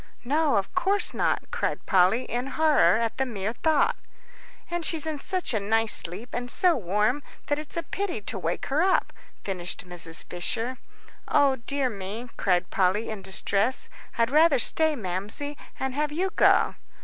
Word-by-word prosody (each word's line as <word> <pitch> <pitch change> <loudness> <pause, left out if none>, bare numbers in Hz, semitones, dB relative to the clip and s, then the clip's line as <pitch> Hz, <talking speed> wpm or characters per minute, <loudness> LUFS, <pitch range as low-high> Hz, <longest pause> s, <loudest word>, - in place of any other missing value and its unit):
"No, 295 +1 +2
of 195 -1 -1
course 385 +3 +1
not," - - -1
cried - - -2
Polly, 190 +5 +3
in 245 +2 -3
horror 305 -5 +4
at 230 -1 -2
the 265 - +1
mere 210 -2 -3
thought. 310 +3 +2 0.8
"And 345 -1 -2
she's 320 -1 -1
in 310 -2 -3
such 370 -2 -2
a 220 - +1
nice 220 +2 +2
sleep 190 +8 -1
and 245 0 -3
so 355 +4 +3
warm, 210 +6 0 0.2
that 290 0 0
it's 305 +3 -6
a 335 - -1
pity 390 - -3
to 200 - -5
wake 170 -1 -2
her 300 - +3
up," 375 +1 +2 0.3
finished 180 -2 -4
Mrs. 170 -2 0
Fisher. 230 +7 -3 0.5
"O 275 -2 +3
dear 270 +3 -1
me," 215 +2 -6
cried 180 -1 0
Polly, 195 +4 +1
in 215 -2 -6
distress, 200 +5 +2 0.3
"I'd 230 +1 +2
rather 310 -1 +5
stay, 315 +5 +3
Mamsie, 210 +7 -4 0.2
and 265 -1 -2
have 295 +2 -1
you 370 +5 -1
go." - - +4
245 Hz, 170 wpm, -26 LUFS, 200-300 Hz, 0.8 s, rather